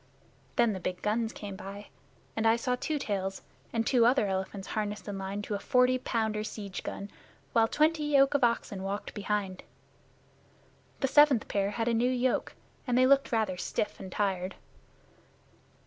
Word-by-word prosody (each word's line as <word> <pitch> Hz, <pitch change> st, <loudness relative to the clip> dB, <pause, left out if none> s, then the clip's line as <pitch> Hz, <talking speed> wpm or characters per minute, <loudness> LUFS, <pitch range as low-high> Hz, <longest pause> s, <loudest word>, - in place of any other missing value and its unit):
Then 235 Hz, -3 st, +3 dB
the 190 Hz, -, -4 dB
big 180 Hz, 0 st, -4 dB
guns 220 Hz, +2 st, 0 dB
came 200 Hz, -2 st, -7 dB
by, 200 Hz, +1 st, -9 dB, 0.5 s
and 225 Hz, 0 st, +1 dB
I 225 Hz, -, +5 dB
saw 250 Hz, +2 st, 0 dB
Two 300 Hz, +4 st, -2 dB
Tails 195 Hz, -7 st, -3 dB, 0.3 s
and 230 Hz, -1 st, 0 dB
two 245 Hz, -1 st, +4 dB
other 240 Hz, -1 st, +4 dB
elephants 190 Hz, 0 st, -3 dB
harnessed 210 Hz, -1 st, -3 dB
in 200 Hz, -1 st, -4 dB
line 195 Hz, +2 st, -4 dB
to 210 Hz, -, -4 dB
a 200 Hz, -, -1 dB
forty 250 Hz, +3 st, +3 dB
pounder 220 Hz, -3 st, -1 dB
siege 205 Hz, -3 st, -6 dB
gun, 200 Hz, +1 st, -6 dB, 0.4 s
while 225 Hz, -1 st, +5 dB
twenty 305 Hz, +3 st, +2 dB
yoke 275 Hz, -2 st, +4 dB
of 285 Hz, -, +2 dB
oxen 230 Hz, -4 st, +1 dB
walked 195 Hz, +2 st, -4 dB
behind. 200 Hz, -2 st, -2 dB, 1.4 s
The 270 Hz, -, +3 dB
seventh 290 Hz, -4 st, +5 dB
pair 200 Hz, -1 st, 0 dB
had 225 Hz, +2 st, -2 dB
a 240 Hz, -, +2 dB
new 235 Hz, +2 st, +2 dB
yoke, 255 Hz, 0 st, 0 dB, 0.3 s
and 245 Hz, -1 st, +2 dB
they 255 Hz, -, +6 dB
looked 275 Hz, +1 st, +4 dB
rather 215 Hz, -5 st, 0 dB
stiff 210 Hz, -, -2 dB
and 190 Hz, -, -8 dB
tired. 190 Hz, -2 st, -1 dB
220 Hz, 170 wpm, -30 LUFS, 200-250 Hz, 1.4 s, they